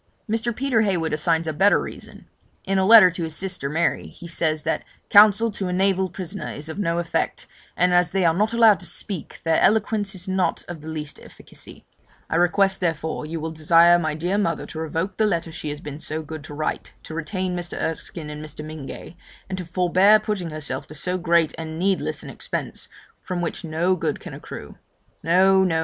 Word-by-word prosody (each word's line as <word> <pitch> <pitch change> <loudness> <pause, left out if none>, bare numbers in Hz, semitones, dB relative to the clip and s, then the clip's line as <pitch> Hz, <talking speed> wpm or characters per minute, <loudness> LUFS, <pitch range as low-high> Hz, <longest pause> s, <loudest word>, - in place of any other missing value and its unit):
Mr. 225 +1 0
Peter 255 -3 +1
Heywood 175 -7 0
assigns 165 +2 +1
a 155 - -2
better 195 +7 +4
reason; - - -9 0.4
in 195 0 +1
a 190 - +2
letter 215 -5 +9
to 170 0 -4
his 160 -1 -3
sister 180 -7 -3
Mary 165 +3 0
he 175 - -11
says, 155 -2 -1
that - - -1 0.3
'Counsel 215 +2 +6
to 195 -2 -4
a 180 - -2
naval 190 0 +1
prisoner 185 +2 -6
is 150 +2 -6
of 160 - -6
no 170 -4 0
effect, 170 -1 -2 0.3
and 180 0 +3
as 175 0 +4
they 190 +1 +1
are 165 - +4
not 210 +6 +1
allowed 225 -3 +5
to 180 - -4
speak, 190 -7 -5
their 165 -1 +2
eloquence 210 -2 +2
is 185 0 -4
not 190 -1 0
of 175 -3 -7
the 155 - -10
least 155 -2 -5
efficacy; - - -13 0.5
I 165 - +2
request, 190 +3 +3
therefore, 160 -3 -2
you 165 +1 -4
will 160 +1 -4
desire 165 +2 +5
my 155 -2 -1
dear 175 +6 -1
mother 165 -6 -1
to 160 - -8
revoke 160 +4 -3
the 220 - +3
letter 170 -4 -1
she 155 -1 -6
has 145 +1 -5
been 150 0 -7
so 155 0 -4
good 155 -1 -8
to - - -9
write 155 +1 -3
to - - -9
retain 180 +3 -3
Mr. 175 -1 -5
Erskine 160 -1 -4
and 150 0 -7
Mr. 150 0 -8
Mingay, 155 +1 -8 0.3
and 190 - -3
to - - -4
forbear 185 +4 +4
putting 210 -5 -3
herself 150 -3 -3
to 155 - -10
so 180 +4 -1
great 170 -2 +2
and 160 0 -5
needless 190 +2 -1
an - - -8
expense, - - -5 0.3
from 185 -2 -4
which 175 +1 -3
no 170 +3 +1
good 180 - -2
can - - -9
accrue. - - -9 0.4
No, 190 +3 +4
no! 165 -3 +1
175 Hz, 205 wpm, -23 LUFS, 160-190 Hz, 0.5 s, letter